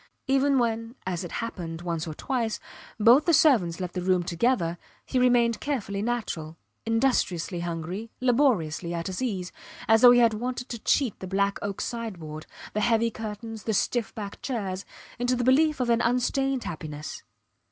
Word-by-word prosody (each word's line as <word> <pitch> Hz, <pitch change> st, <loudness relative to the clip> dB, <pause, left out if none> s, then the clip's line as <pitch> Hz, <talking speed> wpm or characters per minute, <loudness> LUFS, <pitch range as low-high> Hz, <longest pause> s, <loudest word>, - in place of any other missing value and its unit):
Even 275 Hz, +1 st, +3 dB
when 230 Hz, -1 st, -1 dB
as 185 Hz, -1 st, -2 dB
it 175 Hz, -, -7 dB
happened 175 Hz, -7 st, -5 dB
once 170 Hz, -1 st, -2 dB
or 155 Hz, -, -5 dB
twice 230 Hz, -1 st, -2 dB, 0.4 s
both 240 Hz, +7 st, +6 dB
the 335 Hz, -, +5 dB
servants 220 Hz, -, +4 dB
left 180 Hz, -1 st, -4 dB
the 180 Hz, -, -3 dB
room 180 Hz, -1 st, +2 dB
together 170 Hz, -1 st, 0 dB, 0.3 s
he 255 Hz, -, 0 dB
remained 240 Hz, -2 st, +3 dB
carefully 205 Hz, -9 st, -2 dB
natural, 200 Hz, -9 st, -3 dB, 0.3 s
industriously 225 Hz, -7 st, +1 dB
hungry, 175 Hz, +6 st, -4 dB
laboriously 215 Hz, -, +1 dB
at 170 Hz, 0 st, -3 dB
his 185 Hz, +3 st, -4 dB
ease, 190 Hz, -8 st, -2 dB, 0.4 s
as 225 Hz, 0 st, +5 dB
though 245 Hz, -, +10 dB
he 245 Hz, -, +7 dB
had 230 Hz, -2 st, +5 dB
wanted 245 Hz, +3 st, -4 dB
to 235 Hz, -, -5 dB
cheat 250 Hz, -1 st, +1 dB
the 185 Hz, -, -6 dB
black 200 Hz, +1 st, 0 dB
oak 200 Hz, -1 st, -4 dB
sideboard, 175 Hz, -10 st, -5 dB, 0.3 s
the 215 Hz, -, 0 dB
heavy 230 Hz, +1 st, +2 dB
curtains, 220 Hz, 0 st, -7 dB
the 220 Hz, -, 0 dB
stiff 235 Hz, +2 st, 0 dB
backed 205 Hz, -2 st, -7 dB
chairs, 200 Hz, -7 st, -3 dB, 0.3 s
into 245 Hz, +1 st, +1 dB
the 245 Hz, -, -1 dB
belief 300 Hz, +4 st, +4 dB
of 245 Hz, -2 st, +1 dB
an 235 Hz, -, +3 dB
unstained 255 Hz, +2 st, +1 dB
happiness. 155 Hz, -2 st, -6 dB
220 Hz, 170 wpm, -27 LUFS, 180-245 Hz, 0.4 s, though